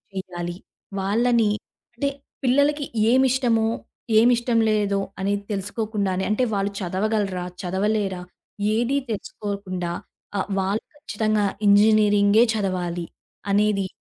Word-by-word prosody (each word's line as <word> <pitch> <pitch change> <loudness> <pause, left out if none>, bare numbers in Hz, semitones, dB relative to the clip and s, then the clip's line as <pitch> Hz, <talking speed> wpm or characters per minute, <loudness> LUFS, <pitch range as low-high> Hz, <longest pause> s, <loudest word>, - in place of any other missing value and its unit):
చేయాలి. 175 -2 -5 0.5
వాళ్లని, 225 +3 +2 0.5
అంటే 280 +4 0 0.3
పిల్లలకి 285 +3 +2 0.3
ఏమిష్టమో, 255 -3 +3 0.5
ఏమిష్టం 240 0 +3
లేదో 205 -2 +1 0.2
అనేది 200 +1 -1
తెలుసుకోకుండానే, 200 -1 -2
అంటే 215 +4 +2
వాళ్ళు 200 0 0
చదవగలరా? 195 0 -1 0.2
చదవలేరా? 195 0 -1 0.5
ఏదీ 240 +5 +1
తెలుసుకోకుండా, 195 -4 -4 0.5
ఆహ్, 195 - -3
వాళ్ళు 195 +3 -1
ఖచ్చితంగా 215 -6 0 0.2
ఇంజినీరింగే 205 +1 +5
చదవాలి! 180 -4 -2 0.5
అనేది 205 -1 +2
205 Hz, 90 wpm, -23 LUFS, 195-225 Hz, 0.5 s, ఇంజినీరింగే